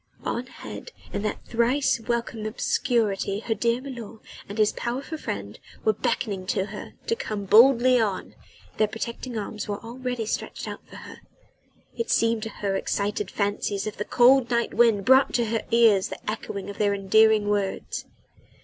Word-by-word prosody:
On 245 +2 -3
ahead 260 - -9 0.2
in - - -1
that 210 0 -3
thrice 240 +3 +2
welcome 230 -1 -2
obscurity 215 -3 0
her 230 - -1
dear 235 +2 0
milor 240 -5 -8 0.3
and 205 - -6
his 215 -1 +4
powerful 260 +6 -4
friend 100 - -5 0.3
were 220 - +4
beckoning 200 -3 -2
to 190 0 0
her 210 - -8
to 460 - +1
come 215 - -4
boldly 245 +4 +6
on 205 -4 -1 0.4
their 215 - +3
protecting 235 +2 -5
arms 210 0 -4
were 205 -1 -2
already 245 0 -4
stretched 215 - -4
out - - -6
for - - -13
her; - - -11 0.7
it 465 - -3
seemed 230 -1 +2
to 220 - -4
her 200 -2 -3
excited 200 0 -1
fancy 205 0 -1
as 200 +1 -3
if 215 - -4
the 210 - -3
cold 250 +2 +5
night 235 -1 0
wind 225 -5 +4
brought 265 +1 +5
to 240 -1 +2
her 225 0 -1
ears 225 -4 +5
the - - -7
echo 215 -1 -4
of 200 - -8
their 205 -1 +2
endearing 215 +2 +4
words. 205 -2 -2
220 Hz, 170 wpm, -25 LUFS, 205-240 Hz, 0.7 s, boldly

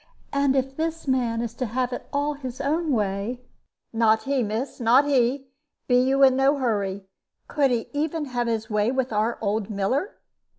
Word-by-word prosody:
And 280 -1 +2
if 270 0 -1
this 325 -1 -3
man 240 -3 0
is 230 -1 -4
to 250 +1 -3
have 250 +3 -1
it - - -6
all 290 +1 0
his 260 -3 -7
own 305 +3 0
way 210 +1 -1 0.3
" - - -55
"Not 220 -1 +3
he, 275 -1 0
miss 225 +6 -3
not 245 +4 +5
he. 265 -1 +1 0.4
Be 245 - +4
you 270 +2 +3
in 260 -1 +6
no 270 +2 +3
hurry. 200 -6 -1 0.4
Could 285 -2 +2
he 235 -2 -1
even 305 +1 -1
have 245 -3 -2
his 220 -1 -1
way 210 0 +1
with 260 -3 -1
our 215 +3 0
old 210 0 -1
miller? 240 - -1
255 Hz, 185 wpm, -24 LUFS, 225-275 Hz, 0.4 s, in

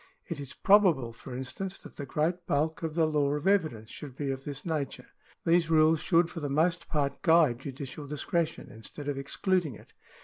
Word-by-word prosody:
It 170 -4 -4
is 140 -1 -8
probable, 175 - +4
for 125 +2 -9
instance, 130 +10 -4
that - - -13
the 140 - -5
great 170 +5 -1
bulk 155 +3 0
of 160 -2 -3
the 165 -2 +4
law 145 -2 +1
of 150 - -4
evidence 155 - +1
should 140 -4 -9
be 140 -1 -2
of 135 0 -5
this 145 -1 -6
nature. 155 -5 -3 0.4
These 165 -1 +3
rules 160 0 +5
should 170 0 +3
for 165 - -5
the 145 -2 -3
most 165 +5 +1
part 140 -2 -1
guide 160 -8 +4
judicial 140 +1 -7
discretion, 155 +3 -2
instead 115 +7 -8
of 140 -2 -1
excluding 160 - 0
it. - - -16
150 Hz, 195 wpm, -29 LUFS, 140-165 Hz, 0.4 s, rules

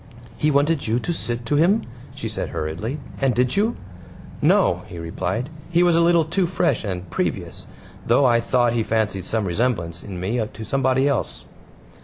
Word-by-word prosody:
"He 150 - +1
wanted 145 0 +2
you 110 +2 +2
to 170 - -2
sit 120 -6 -4
to 145 +5 +1
him," 190 +8 +4 0.3
she - - -4
said - - -3
hurriedly, 85 - -3 0.2
"and 130 -4 +2
did 125 +3 +1
you?" 215 +4 +2 0.7
"No," - - +3
he 85 - -9
replied. 90 - -3 0.2
"He 175 0 +3
was 175 -2 +4
a 165 - +4
little 170 -1 +4
too 175 +3 0
fresh 185 - 0
and 95 -3 -4
previous, - - -3 0.4
though 125 +4 +3
I 120 -2 +4
thought 120 0 +2
he 120 - +1
fancied 110 -4 -1
some 110 0 0
resemblance 85 -4 -1
in 95 -3 -7
me 110 +6 -1
to 110 +1 -8
somebody 135 +1 +2
else." 140 - -1
120 Hz, 180 wpm, -22 LUFS, 105-150 Hz, 0.7 s, him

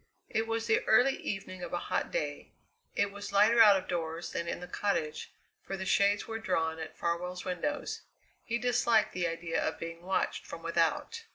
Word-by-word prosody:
It 220 +1 0
was 225 0 -1
the 225 -1 +3
early 250 +5 +5
evening 185 -2 -5
of 175 -1 -6
a - - +1
hot - - +1
day. - - -3 0.5
It 200 0 +1
was 205 +1 -7
lighter 220 +4 +6
out 205 -3 +8
of 190 - -5
doors 165 0 -3
than 170 - -3
in - - -3
the 180 - -8
cottage, 170 -5 -1 0.3
for 195 - -5
the 190 - -4
shades 200 +1 +3
were 225 0 -4
drawn 165 -6 0
at 160 - -7
Farwell's 180 +2 -2
windows; 285 +11 -2 0.4
he 235 - -1
disliked 235 -2 +2
the 175 -1 0
idea 165 0 -2
of - - -1
being 165 0 -6
watched 190 +2 -1
from - - -9
without. 460 0 0
195 Hz, 190 wpm, -31 LUFS, 170-225 Hz, 0.5 s, out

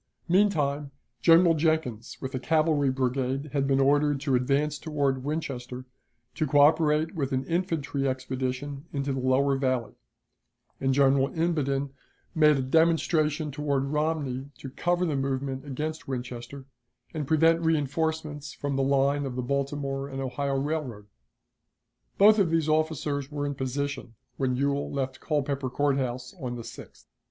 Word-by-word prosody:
Meantime, 150 -7 +2 0.3
General 165 +4 +6
Jenkins 155 -7 -1
with 130 -1 -5
a 130 - -2
cavalry 155 -1 +2
brigade 130 +2 -1
had 140 -1 +1
been 135 0 +2
ordered 145 +1 +3
to 140 -3 0
advance 140 +4 +1
toward 140 -4 -1
Winchester, 130 -4 -4 0.5
to 155 -1 -1
coöperate 150 +2 +4
with 145 -6 -2
an 130 0 -1
infantry 165 -5 -1
expedition 130 +2 -3
into 140 -1 -2
the 135 - -2
lower 130 +2 +2
Valley, 130 -4 -1 0.9
and 135 - +1
General 135 -1 +4
Imboden 140 -5 0 0.4
made 150 -3 +5
a 135 - -1
demonstration 155 0 +2
toward 140 -1 -1
Romney 150 -4 -1
to 135 - -8
cover 175 +5 0
the 155 -4 -1
movement 135 0 -2
against 155 +3 -4
Winchester, 125 +1 -6 0.5
and 150 -3 -3
prevent 165 +2 +4
reënforcements 155 -1 -1
from 145 -1 -3
the - - +2
line 140 +1 +2
of 130 -3 -4
the 125 - -2
Baltimore 140 +1 -2
and 135 -1 -6
Ohio 135 +1 -2
Railroad. 135 -8 -3 1.1
Both 210 +2 +7
these 165 -1 +1
officers 155 -3 0
were 145 -1 -3
in 145 - -2
position 135 -2 -4 0.2
when 130 -2 0
Ewell 140 +2 -1
left 130 -2 -3
Culpeper 140 -3 -1
Court 140 +2 +1
House 125 -1 -4
on 125 -2 -3
the 120 - -6
6th. 115 - -12
140 Hz, 145 wpm, -27 LUFS, 135-155 Hz, 1.1 s, Both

